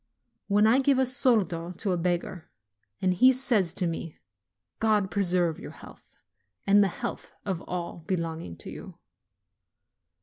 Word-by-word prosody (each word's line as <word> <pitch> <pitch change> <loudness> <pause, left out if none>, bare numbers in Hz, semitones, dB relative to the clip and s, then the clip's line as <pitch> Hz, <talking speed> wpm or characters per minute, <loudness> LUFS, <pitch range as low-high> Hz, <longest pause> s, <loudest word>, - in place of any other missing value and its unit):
When 205 +1 +3
I 230 +4 +5
give 275 0 +3
a 265 - +3
soldo 210 - +2
to 190 +3 -3
a - - +1
beggar, 175 0 -2 0.5
and 185 -1 +3
he 255 +9 +6
says 240 -9 +1
to 185 - +1
me, 165 -1 -4 0.6
"God 210 -4 +2
preserve 175 -4 +1
your - - -8
health, - - -16 0.4
and 205 +1 +5
the - - +2
health 180 - -6
of 190 -4 -2
all 175 -1 -4
be 185 - 0
longing 160 - -5
to - - -9
you - - -10
185 Hz, 155 wpm, -27 LUFS, 170-220 Hz, 0.6 s, he